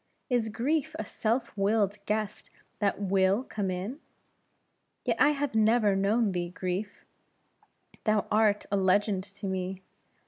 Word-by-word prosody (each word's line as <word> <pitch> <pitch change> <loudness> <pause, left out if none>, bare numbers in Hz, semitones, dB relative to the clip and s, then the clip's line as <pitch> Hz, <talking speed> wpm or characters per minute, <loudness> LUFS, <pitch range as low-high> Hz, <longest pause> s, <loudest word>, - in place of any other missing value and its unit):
Is 235 -3 +2
grief 290 +8 -1
a - - -4
self 230 +2 -1
willed 205 0 +1
guest 215 -1 -2 0.3
that 200 -2 +1
will 195 +3 +2
come 205 -6 -3
in? 190 +10 -4 1.1
Yet - - +1
I 290 - +7
have 290 -2 -1
never 220 -2 +4
known 205 +3 +2
thee, 175 -1 -2
Grief; 185 +3 -4 1.0
thou 215 -2 +2
art 210 -1 +3
a 200 - +2
legend 195 0 +2
to 200 +1 -9
me. 190 0 -3
205 Hz, 135 wpm, -29 LUFS, 195-225 Hz, 1.1 s, I